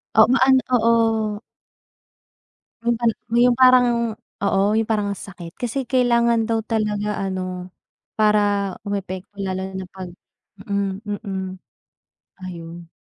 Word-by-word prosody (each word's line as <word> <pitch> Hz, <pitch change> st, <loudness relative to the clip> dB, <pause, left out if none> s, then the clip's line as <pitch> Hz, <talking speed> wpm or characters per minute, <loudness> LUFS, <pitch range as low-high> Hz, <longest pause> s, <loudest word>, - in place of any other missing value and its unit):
Oo, 220 Hz, -, +8 dB
ma 265 Hz, -, +4 dB
an 265 Hz, 0 st, +6 dB, 0.2 s
oo. 225 Hz, -2 st, +2 dB, 1.4 s
Yung 235 Hz, 0 st, +1 dB
pang 235 Hz, -1 st, +2 dB, 0.3 s
yung 245 Hz, 0 st, +4 dB
parang 255 Hz, -1 st, +7 dB, 0.6 s
oo 195 Hz, -1 st, +2 dB
yung 220 Hz, 0 st, 0 dB
parang 210 Hz, -2 st, +1 dB
ang -, -, -10 dB
sakit 175 Hz, -4 st, -10 dB
kasi 250 Hz, +2 st, -3 dB
kailangan 235 Hz, -3 st, +3 dB
daw 225 Hz, -, +2 dB
talaga 210 Hz, -2 st, -1 dB
ano 185 Hz, -1 st, -4 dB, 0.5 s
para 205 Hz, -2 st, +2 dB
umepekto 200 Hz, 0 st, -5 dB
lalo 190 Hz, -1 st, -2 dB, 0.2 s
na 190 Hz, -, -5 dB
pag, 190 Hz, -1 st, -7 dB, 0.6 s
mm, 200 Hz, 0 st, -2 dB, 0.2 s
mm. 190 Hz, -2 st, -4 dB, 1.0 s
Ayun. 170 Hz, -1 st, -8 dB
210 Hz, 120 wpm, -22 LUFS, 190-230 Hz, 1.4 s, Oo